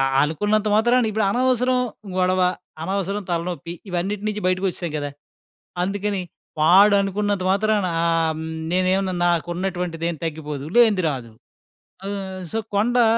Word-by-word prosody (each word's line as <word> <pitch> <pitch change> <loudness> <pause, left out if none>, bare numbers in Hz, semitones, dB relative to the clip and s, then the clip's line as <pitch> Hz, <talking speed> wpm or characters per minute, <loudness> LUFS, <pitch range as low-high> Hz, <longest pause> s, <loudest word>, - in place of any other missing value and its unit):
ఆహ్, 135 - +1
అనుకున్నంత 210 +7 0
మాత్రాన 240 +1 +3
ఇప్పుడు 215 0 0
అనవసరం 255 +1 +2 0.4
గొడవ, 185 0 +2 0.4
అనవసరం 195 +2 -2
తలనొప్పి, 170 0 -3 0.2
ఇవన్నిటి 190 +3 -2
నించి 210 0 -3
బయటికొచ్చేశాం 185 -3 -1
గదా! 145 0 -3 0.7
అందుకని 200 0 -1 0.4
వాడనుకున్నంత 200 +2 +4
మాత్రాన 210 -1 +1 0.2
ఆహ్, 165 -1 +2
హ్మ్, 160 - -5 0.3
నేనుమన్నా 185 +1 +1
నాకున్నటువంటిదేం 175 -1 -1
తగ్గిపోదు, 150 -3 -4
లేంది 215 -7 +5
రాదు. 125 -4 -6 0.8
ఆహ్, 190 -2 -5
సో, 225 - 0 0.2
కొండా, 240 +4 +3
190 Hz, 115 wpm, -22 LUFS, 170-210 Hz, 0.8 s, లేంది